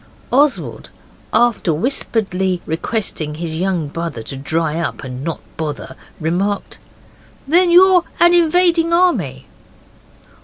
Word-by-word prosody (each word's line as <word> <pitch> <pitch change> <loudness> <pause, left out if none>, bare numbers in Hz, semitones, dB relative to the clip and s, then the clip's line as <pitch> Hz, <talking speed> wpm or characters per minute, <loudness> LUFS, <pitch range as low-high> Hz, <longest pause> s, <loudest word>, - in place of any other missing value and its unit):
Oswald, 285 +2 +1 0.4
after 230 -6 +2
whisperedly 190 - -1
requesting 160 -2 -3
his 160 0 -4
young 180 -4 -1
brother 165 -6 -5
to 135 - -7
dry 160 +3 -2
up 170 - -4
and 130 0 -7
not 165 0 -3 0.2
bother, 150 -4 -5 0.2
remarked, 185 +6 -2 0.7
'Then 350 +4 +4
you're 360 0 +6 0.2
an 345 0 +6
invading 335 0 +3
army? 205 - +1
190 Hz, 110 wpm, -18 LUFS, -, 0.7 s, you're